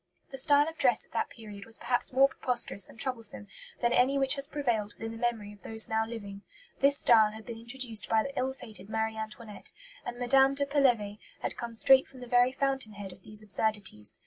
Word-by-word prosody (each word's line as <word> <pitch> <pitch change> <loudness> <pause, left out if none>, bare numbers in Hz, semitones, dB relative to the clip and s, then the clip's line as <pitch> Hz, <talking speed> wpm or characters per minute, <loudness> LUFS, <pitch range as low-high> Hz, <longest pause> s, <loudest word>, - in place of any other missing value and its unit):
The 270 - -4
style 290 +2 +4
of 325 0 -7
dress 245 -4 +4
at - - -31
that 230 - -1
period 210 -3 -11
was 225 +1 -7
perhaps 245 -1 -1
more 270 +1 +5
preposterous 245 -7 0
and - - -16
troublesome 230 -6 -1 0.4
than 240 0 +3
any 260 +3 +3
which 270 -1 +3
has 275 -1 -3
prevailed 240 -9 -2
within 225 0 -7
the 225 - -8
memory 225 -4 -2
of 205 - -18
those 220 +2 0
now 220 0 0
living. 200 -4 -8 0.4
This 280 +1 +6
style 220 -3 +5
had 220 0 -11
been 235 -2 -7
introduced 235 -2 -4
by 220 -1 +3
the 275 - -7
ill 260 +1 -1
fated 220 -6 -6
Marie 220 0 -1
Antoinette, 220 0 -8 0.3
and 245 0 -6
Mme. 270 +2 +4
de 280 0 +1
Pelevé 245 -8 +1 0.2
had - - -2
come 235 -1 -6
straight 265 +3 +6
from 265 - -15
the - - -7
very 245 +1 +3
fountain 270 -4 -2
head 200 -2 -8
of 185 - -18
these 215 +2 -3
absurdities. 205 - -2
235 Hz, 215 wpm, -29 LUFS, 215-265 Hz, 0.4 s, This